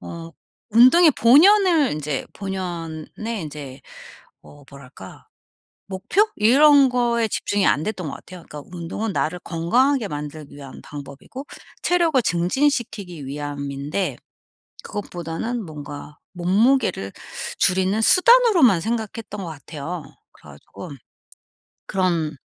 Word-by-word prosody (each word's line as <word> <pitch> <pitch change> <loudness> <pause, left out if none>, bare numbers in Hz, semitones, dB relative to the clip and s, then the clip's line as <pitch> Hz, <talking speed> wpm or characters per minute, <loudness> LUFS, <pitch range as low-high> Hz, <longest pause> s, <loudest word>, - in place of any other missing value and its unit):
어 165 0 -9 0.4
운동의 255 +9 +7
본연을 330 - +5
인제 150 -2 -4
본연의 185 +2 -5
인제 145 -3 -9 0.6
어 145 0 -16
뭐랄까 125 -9 -13 0.6
목표? 195 - +1
이런 275 +5 +6
거에 240 -2 +1
집중이 205 -1 -1
안 150 - +2
됐던 185 -7 -4
것 - - -5
같아요. 180 0 -12
그니까 150 -1 -8
운동은 185 +6 -4
나를 180 +1 -2
건강하게 225 +10 +1
만들기 150 -1 -8
위한 140 -2 -11
방법이고 145 - -10 0.4
체력을 340 -5 +2
증진시키기 190 - -1
위함인데 145 +4 -4 0.7
그것보다는 205 +4 -5
뭔가 150 -2 -9 0.2
몸무게를 190 - +1 0.5
줄이는 190 +3 +2
수단으로만 365 - +5
생각했던 220 -1 -4
것 180 - -6
같아요. 160 +2 -7 0.3
그래 75 - -17
가지고 115 - -12 1.0
그런 170 -5 -1
185 Hz, 270 characters per minute, -22 LUFS, 150-240 Hz, 1.0 s, 운동의